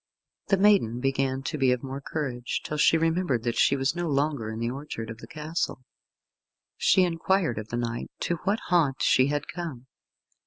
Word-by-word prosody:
The 195 - +3
maiden 190 - +4
began 135 0 0
to 150 - -3
be 130 -2 +4
of 125 0 -1
more 135 +1 -5
courage, 130 -5 -3
till 150 - -4
she 165 - +5
remembered 165 -6 +1
that 120 -1 -1
she 140 - +4
was 135 +3 0
no 175 0 -2
longer 140 -5 0
in 110 - -5
the 115 +1 -1
orchard 130 -5 -6
of 115 - -9
the - - -11
castle. 155 -3 -3 0.9
She 190 - +4
inquired 170 - +1
of 110 - -7
the 120 - -3
knight 120 0 -3
to 170 - 0
what 200 +7 -1
haunt 155 -7 +2
she 130 0 +4
had 145 0 -2
come. 160 -8 -6
140 Hz, 190 wpm, -27 LUFS, 125-165 Hz, 0.9 s, she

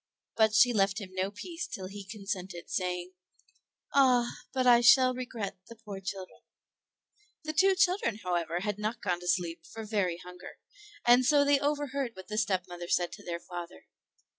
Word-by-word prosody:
But 220 -1 +3
she 245 +2 +6
left 195 0 +2
him 195 -3 -8
no 190 +1 -1
peace 330 - -6
till 190 - -6
he 200 +2 -8
consented 190 -3 -6
saying, 180 -1 -2 0.8
"Ah, 250 -3 +4 0.2
but 260 -1 0
I 240 -1 +7
shall 255 +1 +6
regret 230 -6 -5
the 230 - -11
poor 210 -3 -8
children." 190 -1 -7 1.0
The 310 0 -4
two 380 +4 +4
children, 360 - +2
however, 175 -1 -1
had 205 +1 -3
not 215 +3 -2
gone 180 -3 0
to 175 - -9
sleep 170 -1 0
for 225 +5 -9
very 200 -5 0
hunger, 180 0 -11 0.5
and 245 +1 +6
so 285 +2 +4
they 285 -1 +4
overheard 280 -4 -2
what 190 +2 -11
the 215 0 -1
stepmother 180 -4 -2
said 175 0 +1
to - - -11
their 170 -1 -4
father. 175 - -9
205 Hz, 170 wpm, -30 LUFS, 180-245 Hz, 1.0 s, I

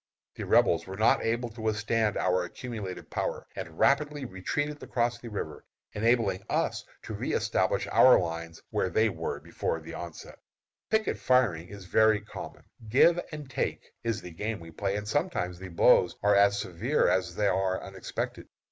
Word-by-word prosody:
The - - -6
Rebels - - +3
were 95 0 -7
not 110 - +4
able 120 +1 0
to 110 0 -10
withstand 110 0 0
our 90 0 +2
accumulated 105 -1 -7
power, - - -2
and 80 - -7
rapidly 145 +1 +2
retreated 145 +10 -3
across 120 -1 -1
the 120 - -8
river, 100 -7 -5 0.3
enabling 115 -3 +1
us - - 0 0.2
to - - -6
reëstablish - - 0
our 130 - +7
lines 85 -1 -5
where 95 - 0
they 110 +3 +3
were - - -4
before 80 - -3
the 80 +1 -10
onset. 85 -2 -8 0.5
Picket 220 0 +1
firing 110 -11 +2
is 100 0 -10
very 110 +3 +4
common. 105 - -9 0.3
"Give 170 +9 +5
and 150 -2 -7
take" 130 - -3
is 115 -2 -1
the 90 - -8
game 105 +6 -3
we 85 -1 -11
play, 100 +4 -2
and 105 0 -4
sometimes 110 - -1
the 95 - -7
blows 85 - +4
are 105 0 +5
as 100 0 +5
severe 110 - 0
as 90 -2 +1
they 105 - 0
are 95 -1 +1
unexpected. 95 0 -5
105 Hz, 165 wpm, -29 LUFS, 90-120 Hz, 0.5 s, our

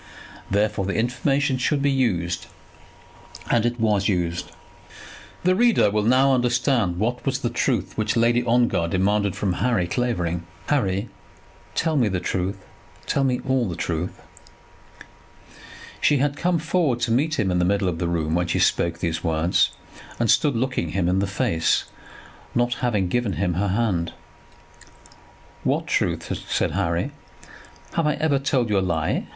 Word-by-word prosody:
Therefore 105 -1 +1
the 100 - -2
information 135 +3 0
should 140 +2 +1
be 140 - +3
used; 90 -11 0 1.0
and: 120 0 +3
it 120 0 -3
was 105 -3 +2
used. 85 -3 -1 0.9
The 185 +1 +4
reader 230 - +4
will 105 +1 +1
now 130 +3 +4
understand 120 -6 +1
what 120 +5 -1
was 135 -1 0
the 120 - -1
truth 120 -5 -1
which 110 +1 0
Lady 120 +1 +3
Ongar 120 -7 +2
demanded 100 +3 +1
from 95 -3 -1
Harry 115 -8 +2
Clavering. 85 -6 -2 0.2
"Harry, 100 -7 0 0.7
tell 160 -1 +1
me 120 -5 +3
the 95 -3 -1
truth; 95 +2 -2 0.5
tell 140 - 0
me 125 -2 0
all 130 -5 +1
the 85 - -4
truth." 85 +2 -3 1.8
She 145 - +4
had 140 +1 0
come 175 +3 +1
forward 160 -5 0
to 120 -1 0
meet 150 +7 +1
him 95 -4 +1
in 90 - +1
the - - +2
middle 100 +1 +1
of 85 -2 -2
the 90 - -1
room 80 -2 -1
when 90 +1 +1
she 85 - 0
spoke 85 0 +1
these 85 0 -2
words, 80 +1 +2 0.5
and 115 -2 +3
stood 145 -5 +3
looking 115 -9 -1
him 90 -2 0
in 90 +2 +2
the 100 - 0
face, 85 -4 +1 0.7
not 120 0 +2
having 105 -7 +1
given 120 +1 0
him 90 0 0
her 100 +5 0
hand. 95 -5 0 1.5
"What - - 0
truth?" - - -1 0.2
said - - +1
Harry. 85 -1 -1 0.8
"Have 165 -2 +1
I 150 - +1
ever 150 -2 +1
told 130 -4 0
you 100 - +3
a - - 0
lie?" 85 -4 -1
110 Hz, 160 wpm, -23 LUFS, 90-130 Hz, 1.8 s, The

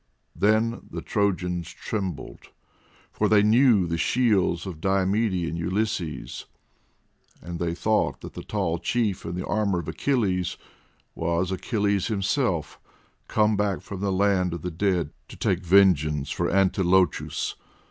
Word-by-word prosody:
Then 110 +3 +2
the - - -6
Trojans 90 -5 -1
trembled, 95 -9 -5 0.6
for - - 0
they 105 -1 +5
knew 110 -2 +5
the 85 0 -2
shields 100 -5 +2
of 85 -5 -7
Diomede 95 -1 +1
and 80 +3 -4
Ulysses, 90 -2 -3 0.9
and 85 +1 -7
they 85 -1 -1
thought 110 +4 0
that - - -9
the - - -7
tall 95 -6 -2
chief 110 -3 -1
in 85 - -4
the 90 - -4
armour 105 -3 0
of 85 - -4
Achilles 95 - 0 0.6
was 85 +2 -1
Achilles 100 -1 0
himself, 100 - -1 0.5
come 105 0 +2
back 100 -1 0
from 100 - -8
the 100 -1 0
land 95 -2 +2
of 85 - -8
the 90 - -3
dead 85 -3 0 0.2
to - - -11
take 95 0 0
vengeance 80 -6 +3
for - - -1
Antilochus. 95 -1 +2
95 Hz, 135 wpm, -25 LUFS, 85-105 Hz, 0.9 s, they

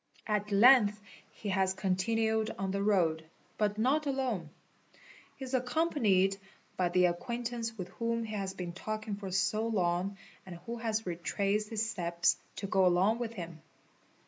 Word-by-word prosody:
At 210 -1 -1
length 210 0 +6 0.3
he 210 - -6
has 190 -1 +1
continued 220 +4 +1
on 195 -1 -2
the 200 +1 -1
road, 175 -6 +2 0.4
but 210 -1 +1
not 280 +7 +2
alone. 255 - -1 0.9
He 270 - -7
is 260 - -8
accompanied 245 - +2 0.4
by 180 -1 +1
the 180 +1 +4
acquaintance 230 +5 -2
with 185 -2 -5
whom 230 0 -2
he 220 -1 -6
has 195 -2 -3
been 175 -2 -5
talking 215 +2 -4
for 200 -1 -6
so 205 +4 +1
long 190 -2 0 0.3
and 185 -2 -9
who 235 +1 -4
has 225 -1 -2
retraced 200 +4 -1
his 225 0 -1
steps 170 -5 +1 0.2
to 200 - -5
go 190 -1 +3
along 190 +6 +3
with 230 -1 -3
him. 170 -5 -8
205 Hz, 155 wpm, -31 LUFS, 185-225 Hz, 0.9 s, length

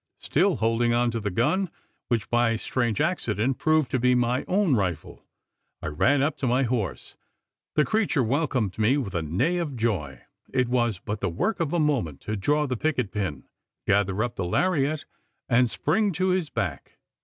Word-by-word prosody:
Still 180 +4 +1
holding 115 0 +1
on 120 0 +2
to 115 - -2
the 105 -1 -2
gun 175 - +1 0.4
which, 115 -4 0
by 120 0 +3
a 115 - 0
strange 120 +1 -1
accident, 130 - 0
proved 155 -5 +2
to 130 - +1
be 125 +1 +3
my 125 +1 +1
own 185 -6 +2
rifle 95 -7 -3 0.6
I - - -4
ran 135 - +2
up 145 0 0
to 135 - -1
my 125 +3 +2
horse. 110 - -2 0.6
The 150 - +4
creature 190 - +1
welcomed 125 - 0
me 115 +6 +3
with 120 -9 -3
a 85 - 0
neigh 100 - 0
of 160 -6 -3
joy! 90 - -2 0.3
It 125 -2 +1
was 120 -4 +1
but 105 +4 -5
the 100 - -1
work 195 - -1
of 160 -4 -1
a 175 - +1
moment 125 - 0
to 110 - -3
draw 145 +9 +1
the 130 -3 -2
picket 130 -7 -1
pin, 95 -10 -3 0.4
gather 100 +1 +2
up 120 - -4
the 95 - -1
laryette, 155 - +1 0.4
and 125 -1 +3
spring 210 - +1
to 185 +3 0
his 180 -4 0
back. 80 -8 -4
120 Hz, 190 wpm, -26 LUFS, 105-150 Hz, 0.6 s, The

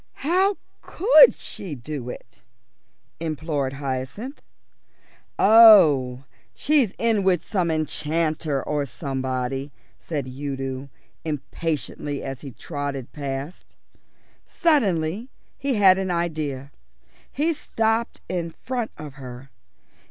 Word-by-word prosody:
"How 375 +5 +3 0.2
could 470 +5 +6
she 175 -7 -5
do 130 0 -6
it?" 120 - -11 0.8
implored 155 -4 -2
Hyacinth. 140 - -5 1.0
"Oh, 160 - +7 0.3
she's 280 -9 +2
in 225 -3 +2
with 185 -3 +1
some 185 -5 0
enchanter 155 -1 -1
or 145 -1 -1
somebody," 130 +1 -3 0.3
said 145 -5 -4
Udo 135 0 -5 0.3
impatiently 150 -1 -4
as 135 -1 -6
he 140 - -7
trotted 140 0 -5
past. 140 +2 -6 0.7
Suddenly 210 - +1 0.3
he 275 -2 -1
had 190 -2 +6
an 190 -1 -2
idea. 155 -6 -2 0.6
He 320 +4 +1
stopped 225 -5 -1
in 175 -2 -2
front 240 +6 -4
of 150 -3 -8
her. 125 +1 -10
155 Hz, 100 wpm, -24 LUFS, 135-205 Hz, 1.0 s, Oh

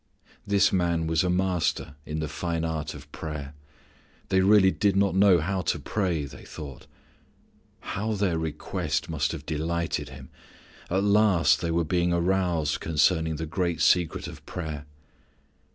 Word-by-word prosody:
_ - - -29 0.2
This 100 0 +3
Man 85 -3 +1
was 80 -1 +1
a 90 - 0
master 90 -5 0
in 80 +1 -3
the 80 - -2
fine 80 +2 -2
art 80 -2 -3
of 75 +1 -12
prayer. 75 -3 -6 0.8
They 95 - +3
really 95 -1 +6
did 100 -1 +1
not 100 0 +3
know 95 -1 +6
how 95 +4 -1
to - - 0
pray, 90 -8 -1
they 70 - -11
thought. 70 -4 -9 0.9
How 110 +3 -3
their 95 -5 0
request 80 0 -3
must 75 -2 0
have 75 -3 -7
delighted 85 -2 -2
Him! 65 0 -11 0.6
At 95 +2 +1
last 100 -8 +4
they 85 - -1
were 85 0 +1
being 90 +1 +1
aroused 85 -3 +1
concerning 80 +1 +2
the 80 +2 -4
great 85 +1 -1
secret 90 -3 +2
of - - -10
power. 80 -4 -5
85 Hz, 155 wpm, -26 LUFS, 75-95 Hz, 0.9 s, really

